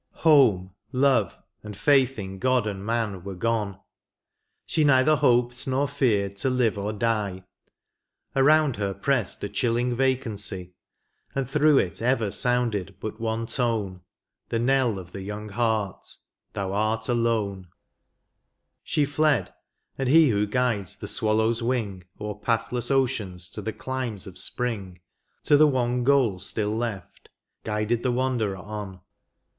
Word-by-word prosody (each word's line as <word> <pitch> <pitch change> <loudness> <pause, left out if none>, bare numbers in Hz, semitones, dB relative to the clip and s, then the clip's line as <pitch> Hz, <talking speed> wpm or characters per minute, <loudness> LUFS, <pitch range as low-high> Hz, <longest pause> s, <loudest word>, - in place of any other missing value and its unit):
Home, 115 - +5 0.2
love, 130 -7 +2 0.2
and 105 -2 -9
faith 135 -3 +3
in 95 -2 -6
God 130 -1 +2
and 100 -2 -4
man 110 -4 -2
were 100 -1 -6
gone. 105 -1 -1 0.9
She 155 - +1
neither 145 +1 +5
hoped 120 0 +2
nor 135 +2 +1
feared 105 -8 0
to 130 - +1
live 125 -4 +1
or 100 +1 -3
die; 105 -4 -1 0.9
Around 145 -1 +4
her 100 -2 -2
pressed 115 -1 -1
a - - -1
chilling 120 +3 0
vacancy, 110 -8 -2 0.6
And 135 -2 -1
through 150 +1 +4
it 90 -4 0
ever 115 -4 +1
sounded 120 -6 0
hut 110 +1 -6
one 115 0 -1
tone, 110 -7 -1 0.5
The 115 - 0
knell 125 -2 +2
of 90 -1 -9
the 95 - -7
young 105 +2 -6
heart, 110 -2 -1 0.3
*' - - -53
thou 95 -1 -3
art 110 +2 0
alone; 110 -6 0 0.6
" - - -53
She 150 - +3
fled, 145 -1 +1 0.5
and 135 -2 0
He 160 0 +6
who 105 -2 +1
guides 105 -4 -1
the - - -8
swallow's 110 +2 +1
wing 110 -7 -2
O'er 105 0 -5
pathless 115 +2 -1
oceans 110 -10 -1
to 105 - -5
the 110 +2 -3
climes 125 -5 -4
of 95 - -9
spring 100 -8 -2 0.4
To 145 - +5
the 155 +1 +6
one 125 -3 0
goal 125 -8 +3
still 105 +2 -2
left, 115 -5 -5 0.3
guided 105 +2 -1
the 125 - 0
wanderer 120 -6 0
on. 100 -1 -7
115 Hz, 145 wpm, -25 LUFS, 100-130 Hz, 0.9 s, He